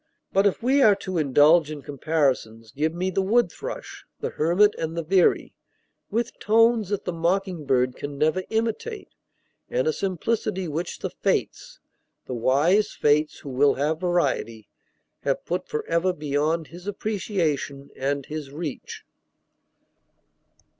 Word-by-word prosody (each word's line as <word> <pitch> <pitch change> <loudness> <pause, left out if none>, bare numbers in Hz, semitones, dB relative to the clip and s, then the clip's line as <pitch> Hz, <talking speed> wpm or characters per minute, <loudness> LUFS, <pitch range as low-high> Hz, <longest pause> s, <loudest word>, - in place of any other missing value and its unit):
But 195 +1 +4
if 200 - -2
we 270 +3 +3
are 215 -5 +6
to 185 -3 -3
indulge 150 +3 +5
in 150 -2 -7
comparisons, 135 -7 -1
give 155 +5 0
me 180 +3 -2
the 195 - +1
wood 210 0 +2
thrush, - - -7 0.2
the - - -3
hermit, 180 +7 +3
and 165 +1 -3
the 165 - -1
veery; 185 +3 +2 0.6
with 230 +2 -2
tones 225 -1 +3
that 205 -2 -2
the 180 - -2
mocking 170 -1 -1
bird 125 -1 +2
can 145 0 -6
never 155 +6 +2
imitate, 230 - -2 0.6
and - - 0
a 470 - +2
simplicity 195 - -2
which 160 +3 -4
the - - -4
Fates - - -2 0.5
the - - -5
wise 145 - +2
Fates, 150 +1 +1
who 145 - -8
will 140 +2 +3
have 155 +3 0
variety 145 - -1 0.5
have - - -1
put - - -3
forever 185 - 0
beyond 150 +1 -1
his 175 +3 -11
appreciation 175 -9 -2
and 140 0 -2
his 150 -2 -6
reach. 150 -1 -6
170 Hz, 140 wpm, -25 LUFS, 145-200 Hz, 0.6 s, are